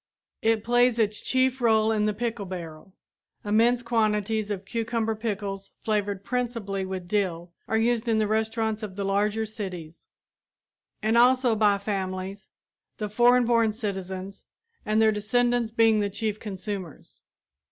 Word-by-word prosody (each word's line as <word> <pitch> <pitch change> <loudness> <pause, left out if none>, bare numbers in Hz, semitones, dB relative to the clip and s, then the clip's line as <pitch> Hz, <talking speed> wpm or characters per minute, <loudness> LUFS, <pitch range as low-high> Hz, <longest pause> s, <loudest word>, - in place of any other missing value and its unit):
It 225 -1 +2
plays 245 0 +3
its 215 -2 +1
chief 260 0 +1
role 220 -2 +3
in 215 -1 +1
the 210 - +1
pickle 230 -3 -3
barrel. 170 -1 -8 0.5
Immense 230 +4 +3
quantities 215 -2 0
of 200 -2 -4
cucumber 225 0 -1
pickles 205 -3 -4
flavored 205 -2 -1
principally 230 -6 -2
with 185 -2 -5
dill 175 -4 -1 0.2
are 220 - +1
used 235 +1 +1
in 225 -1 +2
the 215 - +2
restaurants 220 +1 -1
of 205 -4 -6
the 200 0 -3
larger 210 +3 +1
cities 180 -7 -7 1.0
and 225 +2 +3
also 250 -1 +4
by 205 -2 +3
families, 190 -1 -4 0.5
the 210 -1 -3
foreign 245 +3 +4
born 230 -2 +3
citizens 195 -3 -5 0.4
and 215 +1 +2
their 220 0 +5
descendants 240 +2 +1
being 225 -1 +4
the 205 -1 0
chief 210 +1 -3
consumers. 195 -4 -7
215 Hz, 140 wpm, -26 LUFS, 200-230 Hz, 1.0 s, their